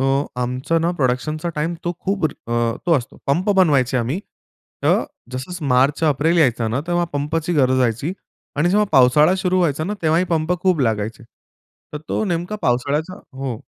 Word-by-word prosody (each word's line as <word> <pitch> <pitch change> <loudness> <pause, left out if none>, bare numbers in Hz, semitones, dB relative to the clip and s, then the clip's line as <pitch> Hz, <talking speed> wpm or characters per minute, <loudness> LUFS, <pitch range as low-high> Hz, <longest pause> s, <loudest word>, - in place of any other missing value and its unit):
अ, - - +1 0.4
आमचं 130 +7 -1
ना 170 +1 +1
प्रोडक्शनचा 145 +5 -1
टाईम 165 +3 -1
तो 175 - 0
खूप 195 -3 -1
अ, 120 -4 -2
तो 170 - +3
असतो 120 - -10
पंप 175 +9 +1
बनवायचे 140 -8 +3
आम्ही. 125 +10 -2 0.6
तर - - +3 0.3
जसं 150 +6 -5
मार्च 135 +4 +2
एप्रिल 155 +3 +2
यायचं 120 -7 +2
ना 125 +5 0
तेव्हा 175 0 +1
पंपची 155 +4 -1
गरज 130 -3 +3
राहायची 125 +7 0 0.4
आणि 160 +4 +2
जेव्हा 210 +2 +3
पावसाळा 150 +6 +5
सुरु 185 -1 0
व्हायचा 155 -3 +1
ना, 205 - -2
तेव्हा 160 +1 +3
ही 185 - +2
पंप 160 +1 +1
खूप 185 -6 +2
लागायचे. 110 -1 -1 0.7
तर 150 - -4
तो 220 - 0
नेमका 175 +3 -2
पावसाळ्याचा 145 +8 0 0.2
हो. 130 -5 -3
150 Hz, 170 wpm, -20 LUFS, 125-175 Hz, 0.7 s, पावसाळा